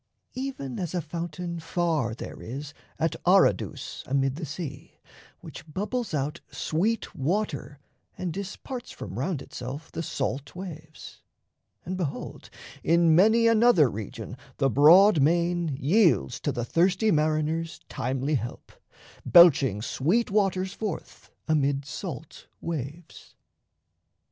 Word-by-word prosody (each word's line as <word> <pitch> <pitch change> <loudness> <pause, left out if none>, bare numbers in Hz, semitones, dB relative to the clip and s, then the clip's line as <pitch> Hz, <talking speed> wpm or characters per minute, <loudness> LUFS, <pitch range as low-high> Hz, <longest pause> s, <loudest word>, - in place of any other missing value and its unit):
Even 255 - -5
as 180 -1 -3
a - - +1
fountain 170 +2 -5
far 160 - -1
There - - -8
is 140 +5 -7 0.2
at 160 +1 0
Aradus 180 - +2
amid 135 0 +1
the 160 0 -5
sea, 145 -1 -7 0.4
Which 155 - -11
bubbles 220 +7 -2
out 150 +4 -2
sweet 205 +8 -1
water 165 0 -2 0.4
and 180 -3 -3
disparts 220 - -6
From 100 +3 -7
round 150 0 -2
itself 135 +6 -7
the 165 - -4
salt 140 -2 -3
waves; 160 -4 -9 0.6
and, 185 +1 -3
behold, 160 -7 -5 0.3
In 170 0 +4
many 220 +7 +5
another 225 - +5
region 105 -1 -7 0.2
the 135 -1 +2
broad 165 - +7
main 170 +3 +2
Yields 160 - +3
to - - -1
the 120 - -3
thirsty 185 - +2
mariners 155 +1 0
timely 135 +4 -2
help, 120 -4 -4 0.5
Belching 140 - +6
sweet 190 - 0
waters 190 -2 +1
forth 205 -5 -6 0.2
amid 140 -3 +1
salt 155 0 -7
waves. 160 0 -7
165 Hz, 120 wpm, -27 LUFS, 140-185 Hz, 0.6 s, broad